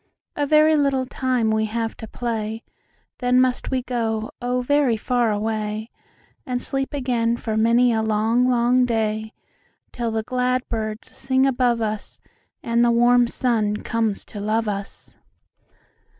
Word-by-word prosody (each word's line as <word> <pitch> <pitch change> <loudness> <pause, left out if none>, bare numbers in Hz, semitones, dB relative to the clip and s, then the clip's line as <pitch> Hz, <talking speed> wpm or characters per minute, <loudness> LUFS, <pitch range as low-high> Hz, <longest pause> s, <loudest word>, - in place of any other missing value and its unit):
"A 290 -1 -1
very 310 +1 +5
little 275 -3 +1
time 250 -3 0
we 220 0 +1
have 225 +1 -3
to 220 - -8
play, 225 -1 -4 0.6
Then 250 0 +3
must 255 -1 +1
we 260 -2 -1
go, 225 -3 -2
oh, 250 +1 0
very 270 -3 +2
far 240 0 +1
away, 215 +1 -3 0.5
And 250 -1 -2
sleep 270 +1 -3
again 240 -4 0
for 220 -2 -3
many 235 +2 +4
a 220 - +1
long, 220 +3 +2
long 245 +1 +3
day, 220 -2 -1 0.6
Till 235 -1 -3
the 220 0 -2
glad 255 +1 -1
birds 215 -1 -5
sing 265 0 +1
above 245 -3 +1
us, 215 -1 -4 0.4
And 235 0 +2
the 240 - +4
warm 240 +1 +4
sun 220 -4 0
comes 225 -3 -1
to 205 - -9
love 215 +2 0
us. 200 -1 -6
235 Hz, 150 wpm, -22 LUFS, 220-250 Hz, 0.6 s, very